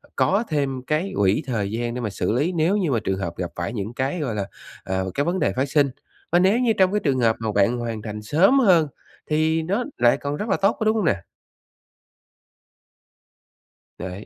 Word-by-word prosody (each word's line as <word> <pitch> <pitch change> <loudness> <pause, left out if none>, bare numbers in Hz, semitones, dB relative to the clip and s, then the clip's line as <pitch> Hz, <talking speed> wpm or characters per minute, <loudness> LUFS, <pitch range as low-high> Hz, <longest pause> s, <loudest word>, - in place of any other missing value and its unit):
có 200 +5 +2
thêm 140 -4 -1
cái 155 +6 0
quỹ 100 +8 +2
thời 105 -5 -2
gian 120 +1 -2
để 125 - -4
mà 110 - -2
xử 100 - -2
lý 145 +9 +1
nếu 170 +3 +1
như 180 -8 0
mà 115 - +2
trường 95 -1 -1
hợp 85 -3 -4
gặp 90 -2 -3
phải 85 +7 -3
những 105 +1 -4
cái, 135 +7 -2
gọi 125 -8 -2
là, 100 -2 -2 0.4
à, 95 0 -2
cái 145 - 0
vấn 175 +4 -1
đề - - +1
phát 130 +2 0
sinh. 145 -2 +3 0.4
Và 175 - +5
nếu 195 +6 +3
như 235 -3 +3
trong 190 -1 +4
cái 210 - +1
trường 135 -4 +1
hợp 115 -2 +3
mà 110 -1 -2
bạn 105 +5 +3
hoàn 115 -2 -4
thành 105 -1 -6
sớm 185 - +4
hơn 175 - +5 0.4
thì 160 +1 +2
nó 200 +9 -1
lại 120 0 +4
còn 145 +1 -3
rất 215 - -4
là - - +2
tốt, 195 - +2
có 220 - -1
đúng 215 +1 +3
hông 210 -6 0
nè? 100 - +1 2.8
Đấy. 95 +3 -7
140 Hz, 220 wpm, -23 LUFS, 110-180 Hz, 2.8 s, Và